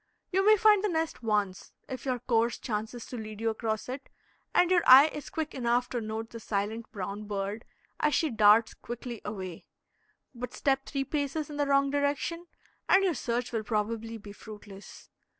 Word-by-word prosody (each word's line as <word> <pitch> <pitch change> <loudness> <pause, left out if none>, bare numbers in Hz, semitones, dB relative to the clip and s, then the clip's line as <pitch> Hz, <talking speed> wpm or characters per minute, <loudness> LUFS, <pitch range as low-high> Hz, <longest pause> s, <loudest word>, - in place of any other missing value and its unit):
You 385 +1 +2
may 430 +1 +6
find 420 -1 +5
the - - +3
nest 320 -4 -2
once, 210 -4 -1
if 260 -1 -7
your 255 -2 0
course 235 -1 +1
chances 225 +1 -4
to 250 - -7
lead 215 -1 -7
you 225 0 +1
across 220 -1 -3
it 265 +2 -6 0.4
and 355 0 +3
your 355 -2 +5
eye 270 +4 +10
is 295 - -7
quick 315 -1 -3
enough 245 -1 0
to 240 - -2
note 220 +1 -5
the 230 - -7
silent 220 +2 -3
brown 200 +1 -5
bird 205 +1 -4 0.3
as 300 - +2
she 315 -4 +1
darts 220 0 +5
quickly 240 -1 -7
away; 185 -5 -6 0.7
but 245 0 -7
step 270 -1 0
three 275 -1 -2
paces 295 +2 -2
in 290 - -6
the 290 -1 +1
wrong 275 0 +3
direction, 285 +4 -1 0.4
and 390 - +6
your 370 -3 +2
search 240 -3 -2
will 225 -2 -1
probably 225 +2 -2
be 205 -1 -11
fruitless. 205 -1 -12
235 Hz, 185 wpm, -29 LUFS, 215-285 Hz, 0.7 s, eye